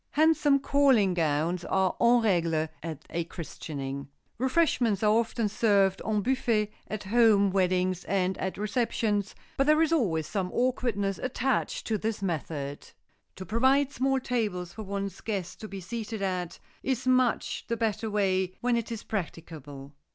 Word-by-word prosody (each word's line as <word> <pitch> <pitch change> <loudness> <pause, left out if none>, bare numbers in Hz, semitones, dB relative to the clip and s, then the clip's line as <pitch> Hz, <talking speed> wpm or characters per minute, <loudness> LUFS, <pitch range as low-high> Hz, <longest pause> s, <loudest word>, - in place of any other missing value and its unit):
Handsome 310 -2 +4
calling 270 -8 +3
gowns 165 +1 0
are 190 0 +1
en 240 0 +5
règle 165 -6 +1
at 160 -3 -7
a 170 - -1
christening. 140 -5 -6 0.3
Refreshments 255 - +2
are 210 - +5
often 230 0 +1
served 200 -2 +2
en 210 -2 0
buffet 230 -4 +1 0.2
at 215 -1 -5
home 205 -2 +4
weddings 185 -1 +1
and 190 -1 0
at 190 - -3
receptions 210 -1 -1 0.2
but 275 - +2
there 305 +1 +5
is 325 0 +3
always 175 - +1
some 190 -1 -2
awkwardness 235 -6 0
attached 255 +1 -1
to 220 -2 -1
this 220 -1 -3
method. 145 -5 -4 0.5
To 185 - -7
provide 265 +6 +3
small 270 +1 +1
tables 205 -9 -2
for 220 - -7
one's 200 -2 -4
guests 195 -5 -3
to 215 - -8
be 195 -1 -7
seated 220 +2 -5
at 180 -3 -2 0.2
is 260 -1 -2
much 255 -2 +1
the 230 - -1
better 220 0 -1
way 190 -3 0
when 245 0 +1
it 235 0 -2
is 225 - -5
practicable. 155 -7 -6
205 Hz, 150 wpm, -28 LUFS, 180-235 Hz, 0.5 s, en